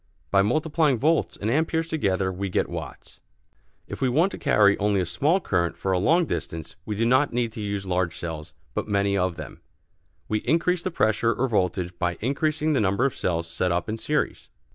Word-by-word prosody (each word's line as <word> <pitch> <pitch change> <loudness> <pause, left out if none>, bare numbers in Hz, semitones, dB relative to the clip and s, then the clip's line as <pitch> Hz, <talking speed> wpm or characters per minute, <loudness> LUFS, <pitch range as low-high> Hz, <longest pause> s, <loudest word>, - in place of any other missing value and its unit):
By 100 - +5
multiplying 150 +5 +2
volts 120 - +1
and 110 +2 -1
ampères 160 +3 +1
together 100 - 0
we 95 +2 -3
get - - 0
watts. - - -8 0.7
If - - -7
we 130 - +2
want 165 +10 +2
to - - -7
carry 105 -8 +4
only 100 -1 +2
a 90 - 0
small 140 - +1
current 85 - -1
for 95 - -2
a 90 - +2
long 165 - +3
distance 80 - -5
we 105 - -2
do 115 +3 +1
not 130 +4 +3
need 120 -1 0
to 110 - -7
use 100 -1 -3
large 90 -2 -1
cells, 80 -2 -6 0.2
but - - -3
many 100 -1 +1
of 90 -2 0
them. - - -9 0.7
We 110 - 0
increase 170 +8 +1
the 185 - -2
pressure 115 - +1
or 130 - 0
voltage 90 -5 -1
by 90 -1 -1
increasing 155 +5 0
the 135 - +2
number 100 +6 +2
of 135 - 0
cells 85 -2 -1
set 90 +2 -1
up 90 +1 -1
in 110 +1 -3
series. - - -2
105 Hz, 205 wpm, -25 LUFS, 90-140 Hz, 0.7 s, By